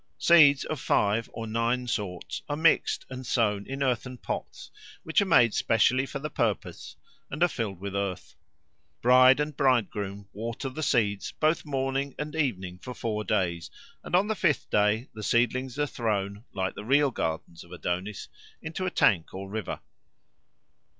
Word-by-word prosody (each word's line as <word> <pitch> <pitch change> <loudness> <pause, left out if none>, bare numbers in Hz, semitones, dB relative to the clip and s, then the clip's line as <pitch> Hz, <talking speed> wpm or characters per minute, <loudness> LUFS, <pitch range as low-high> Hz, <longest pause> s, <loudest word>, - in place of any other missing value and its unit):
Seeds 150 -5 +6
of 155 - -4
five 110 +1 +1
or 115 - -6
nine 115 +3 0
sorts 100 -7 -4
are 145 - 0
mixed 160 +2 +2
and 130 0 -7
sown 105 -5 0
in 135 +1 -3
earthen 125 0 -1
pots, - - -6 0.3
which 160 +5 +2
are - - +1
made 115 - +5
specially 130 +4 +2
for 140 - -5
the 145 +2 -4
purpose 110 -4 -2 0.3
and 150 +5 -1
are - - +6
filled 110 - -4
with 100 +1 -5
earth. 100 -2 -3 0.7
Bride 130 +2 +7
and 150 -1 -2
bridegroom 100 -7 0
water 115 +5 -4
the 135 +4 -6
seeds 105 -9 0
both 155 +1 +1
morning 135 -1 -2
and 150 +1 -5
evening 95 - -2
for 125 +4 -8
four 105 -2 -2
days; 85 -3 -1 0.3
and - - -1
on 185 +3 +4
the 220 - +1
fifth 175 -8 0
day 105 +4 +2
the 110 - -8
seedlings 125 +4 0
are 145 - +1
thrown, 105 -4 -3
like 95 -1 -2
the 105 - -8
real 140 +4 +3
gardens 80 -4 -4
of 85 - -18
Adonis, 90 +3 -4 0.3
into 175 +4 -4
a - - +2
tank 95 - +2
or 95 +1 -6
river. 110 -2 -4
120 Hz, 165 wpm, -27 LUFS, 100-140 Hz, 0.7 s, Bride